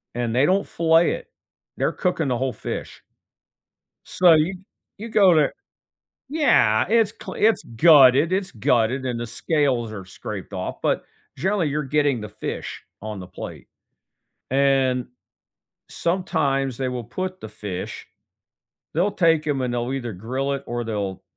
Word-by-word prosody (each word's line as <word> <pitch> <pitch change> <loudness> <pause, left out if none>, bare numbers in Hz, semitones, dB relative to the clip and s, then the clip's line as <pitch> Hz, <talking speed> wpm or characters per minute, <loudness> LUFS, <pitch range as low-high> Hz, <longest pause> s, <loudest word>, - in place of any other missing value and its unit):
and 120 -1 -1
they 130 +3 +4
don't 195 +3 +2
fillet 165 0 +3
it. - - -5 0.5
They're - - +1
cooking 180 -4 -1
the 125 -2 0
whole 130 -1 -1
fish. - - -6 1.0
So, 180 -2 +5
you 160 +4 +2 0.4
you 225 +3 -7
go 195 -5 +5
to 155 -2 +4 0.8
Yeah, 270 - +3
it's 225 -1 +3
cle - - -9
it's 220 +1 +2
gutted, 145 +1 +6
it's 190 0 0
gutted, 125 +1 +1
and 120 -2 -2
the 120 - -3
scales 130 -4 0
are 100 -3 -7
scraped 95 - -8
off, - - -5
but, - - 0 0.3
generally, 190 -3 0
you're 150 +1 -1
getting 145 -3 +1
the 105 - -6
fish 105 - -6 0.2
on 105 -3 -5
the 90 - -8
plate, 90 - -9 0.8
and 135 -2 +2 0.8
sometimes 140 -8 -1
they 130 -1 -2
will 125 -2 -4
put 185 - -5
the 110 - -7
fish 100 -3 -6 0.9
they'll 180 +6 +2
take 165 -5 +2
'em 145 -3 0
and 125 - -1
they'll 120 +1 -2
either 120 -4 -4
grill 130 +8 -3
it 140 0 -3
or 120 0 -3
they'll 100 -4 -3
135 Hz, 150 wpm, -23 LUFS, 120-170 Hz, 1.0 s, gutted